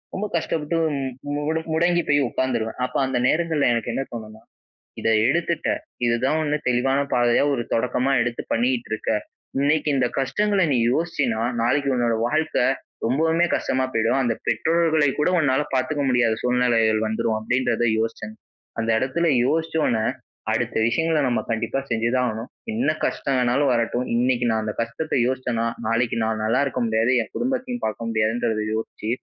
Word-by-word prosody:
ரொம்ப 210 +2 -2
கஷ்டப்பட்டு 160 0 -2 0.6
மு 145 - -2 0.3
முடங்கி 175 +1 +2
போய் 145 0 +4
உட்கார்ந்துருவேன். 120 -3 -2
அப்ப 125 - -3
அந்த 130 -1 -1
நேரங்கள்ல 160 -4 +2
எனக்கு 115 -2 -2
என்ன 135 - -2
தோணுனா, 110 -1 -8 0.6
"இத - - -1 0.2
எடுத்துட்ட, 170 +2 0 0.4
இதுதான் 130 +6 +1
1 150 0 0
தெளிவான 135 +3 +2 0.2
பாதையா, 120 +2 +3
ஒரு 120 - -1
தொடக்கமா 125 +3 +1
எடுத்து 120 -1 -3
பண்ணிகிட்டு 120 0 0
இருக்க. 110 - -3 0.5
இன்னைக்கி 150 +2 +2
இந்த 125 -2 +2
கஷ்டங்கள 200 +8 +1
நீ 125 - +2 0.2
யோசிச்சேன்னா, 140 -9 0 0.2
நாளைக்கி 140 +3 +1
உன்னோட 120 -2 +1
வாழ்க்கை, 155 -3 +1 0.4
ரொம்பவுமே 160 +7 +2
கஷ்டமா 130 - 0
போயிடும். 115 +4 +2
அந்த 120 -2 +1
பெற்றோர்களை 160 -2 +2
கூட 150 - +3
உன்னால 135 -1 +2
பார்த்துக்க 130 +3 0
முடியாத 120 -3 +2
சூழ்நிலைகள் 115 -3 +2
வந்துரும்." 110 0 -1
அப்பிடின்றத 120 +2 0 0.2
யோசிச்சேன். 110 -1 -4 0.4
அந்த 115 0 -1
இடத்துல 160 +6 0 0.2
யோசிச்ச 160 +3 0
ஒண்ணே, 110 -2 +1 0.5
அடுத்த 115 +1 -1
விஷயங்கள 160 +7 +1
நம்ம 125 -2 +1
கண்டிப்பா 115 +3 -1
செஞ்சுதான் 120 +2 +1
ஆகணும். 110 +2 -4 0.3
என்ன 225 -4 +1 0.2
கஷ்டம் 140 - -1
வேணாலும் 125 +3 +2
வரட்டும், 120 +1 0
இன்னைக்கு 125 0 +1
நான் 110 0 +1
அந்த 105 -1 -3
கஷ்டத்த 115 +7 -3
யோசிச்சேன்னா, 125 -3 -1 0.2
நாளைக்கு 115 +1 +1
நான் 110 0 -1
நல்ல 115 +5 +2
இருக்க 130 -1 -3
முடியாது. 110 +2 +2
என் 110 - -6
குடும்பத்தையும் 250 -1 -2
பார்க்க 110 +2 -3
முடியாதுன்றத 110 0 0
யோசிச்சி 110 0 -4
125 Hz, 150 wpm, -23 LUFS, 115-150 Hz, 0.6 s, போய்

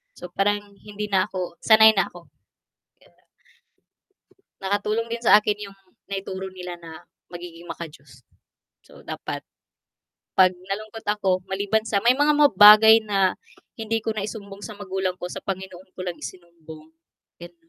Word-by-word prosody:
So 180 - -10
parang 205 +3 +1 0.2
hindi 210 0 -7
na 190 -1 +2
ako 180 -2 -6
sanay 220 0 +7
na 195 -4 +1
ako. 175 -1 -14
Di - - -59 1.1
ba. - - -31 1.0
Nakatulong 210 +3 -1
din 235 0 -4
sa 220 - +7
akin 210 -1 -3
yung 195 - -15 0.3
naituro 190 -1 -5
nila 180 -1 -8
na 165 -2 -12 0.3
magiging 175 -1 -10
maka 170 -1 -7
Diyos. 135 -3 -18 0.6
So - - -17
dapat, - - -6 0.9
pag 185 -1 +6
nalungkot 200 +5 -8
ako, 195 -3 0
maliban 200 +3 -1
sa 205 -2 0
may 245 +2 +4
mga 290 +2 +3 0.2
bagay 215 +2 +9
na, 195 -3 +1 0.4
hindi 225 0 -2
ko 225 - -1
naisumbong 200 -1 -7
sa 215 - -8
magulang 190 -2 -3
ko - - -4
sa - - -6
Panginoon 190 -1 -7
ko - - -9
lang 175 -2 -4
isumbong. 160 -3 -12 0.5
And 175 0 -11
195 Hz, 150 wpm, -23 LUFS, 180-210 Hz, 1.1 s, bagay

